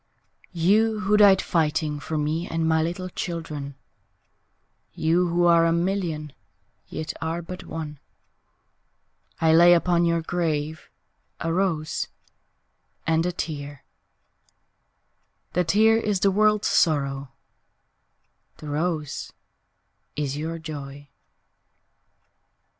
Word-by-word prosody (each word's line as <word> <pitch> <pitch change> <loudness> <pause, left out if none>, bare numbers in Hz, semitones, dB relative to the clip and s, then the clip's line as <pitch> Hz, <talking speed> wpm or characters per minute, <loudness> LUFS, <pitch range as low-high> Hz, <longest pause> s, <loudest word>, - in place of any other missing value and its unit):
YOU 210 +5 +2
who 210 +1 +2
died 200 -2 +6
fighting 155 -2 0
For 155 +2 -4
me 155 +3 -1
and 165 0 -1
my 160 0 +3
little 175 +3 -3
children; 155 -6 -5 1.2
You 170 +3 +2
who 175 +1 +1
are 170 -1 +5
a - - +2
million 170 -4 -1 0.5
Yet 155 - -5
are 165 +2 -2
but 180 +2 -8
one, 155 -3 -6 1.4
I 160 -1 +4
lay 175 +2 +7
upon 170 0 +2
your 170 -1 +1
grave 160 -3 -2 0.5
A 165 0 -1
rose 165 -4 -1 1.0
and 165 +1 +2
a - - 0
tear 145 -5 -6 1.7
The 180 - +2
tear 220 +5 +4
is 210 -4 -1
the 200 - +4
world's 210 +1 +3
sorrow, 140 -4 +1 1.2
The 150 - -9
rose 155 -1 -2 0.8
is 145 -2 -2
your 160 +3 -4
joy. 145 -3 -8
165 Hz, 105 wpm, -24 LUFS, 150-180 Hz, 1.7 s, lay